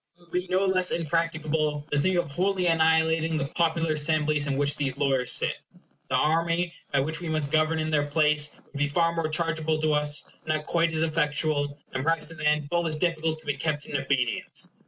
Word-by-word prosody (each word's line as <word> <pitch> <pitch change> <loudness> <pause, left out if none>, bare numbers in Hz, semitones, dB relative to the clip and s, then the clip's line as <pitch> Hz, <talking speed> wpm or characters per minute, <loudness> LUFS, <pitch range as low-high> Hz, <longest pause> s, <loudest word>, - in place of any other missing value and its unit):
It - - -14
would 170 -1 -16
be 180 +1 -1
no 185 +1 +2
less 185 -1 +2
impracticable 155 -2 -1
to 145 - +2
think 185 +5 +2
of 175 -4 -1
wholly 185 +3 0
annihilating 160 -1 +2
the 140 - -1
popular 165 -1 +1
assemblies 150 -1 +1
in 135 -1 -1
which 145 0 +2
these 135 -2 -2
lawyers 135 -3 +2
sit. - - +2 0.5
The - - +1
army, 170 +2 +1 0.2
by 140 - +2
which 160 +4 0
we 170 - -4
must 155 -2 -1
govern 155 +1 +2
in 155 0 -2
their 145 -1 +1
place, 150 -1 +2 0.2
would 145 - -9
be 145 - +2
far 165 +3 +1
more 165 -2 -1
chargeable 160 -1 0
to 155 0 +1
us, 150 0 0 0.2
not 155 -1 +1
quite 170 0 +1
so 160 0 +1
effectual, 150 -2 0 0.2
and 130 - -2
perhaps 165 +1 0
in 165 - -11
the 155 -1 -1
end 150 -1 +1
full 170 -1 +1
as 155 - -1
difficult 160 -1 0
to - - -22
be 145 - 0
kept 150 -1 -2
in - - -6
obedience. 135 -4 -1
155 Hz, 215 wpm, -26 LUFS, 145-165 Hz, 0.5 s, no